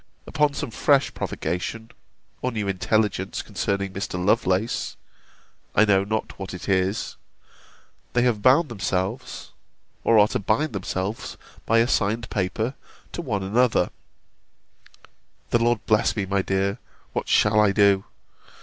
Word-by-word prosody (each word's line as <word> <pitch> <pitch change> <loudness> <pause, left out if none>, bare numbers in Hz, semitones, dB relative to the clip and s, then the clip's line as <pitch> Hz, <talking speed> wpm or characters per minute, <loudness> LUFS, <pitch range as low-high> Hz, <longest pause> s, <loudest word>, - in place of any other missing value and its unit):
Upon 150 -1 +1
some 145 -5 -4
fresh 140 +5 +2
provocation, 90 +7 -4 0.5
or 125 - -1
new 105 -3 -3
intelligence 100 +1 0
concerning 100 -1 -2
Mr. 100 +1 -4
Lovelace, 105 +2 0 0.8
(I 110 - +6
know 100 -2 +3
not 110 +1 -3
what 95 -1 -6
it 90 - -8
is,) 95 +1 0 1.0
they 120 - +3
have 120 -4 +1
bound 135 +7 +5
themselves, 100 +2 -3 0.5
or 115 - +4
are 105 0 +7
to 125 - -1
bind 110 +9 0
themselves, 95 +1 -4 0.3
by 115 - +4
a 115 +1 +4
signed 110 -1 0
paper, 105 +6 -1 0.4
to - - -4
one 105 - -2
another 115 +5 +2 1.6
[The 120 - +4
Lord 115 -1 +1
bless 110 -2 +2
me, 100 -3 -1
my 100 +1 +1
dear, 100 +3 -1 0.3
what - - -3
shall 105 0 +4
I 105 -2 +5
do! 100 -1 +4
105 Hz, 135 wpm, -24 LUFS, 95-115 Hz, 1.6 s, are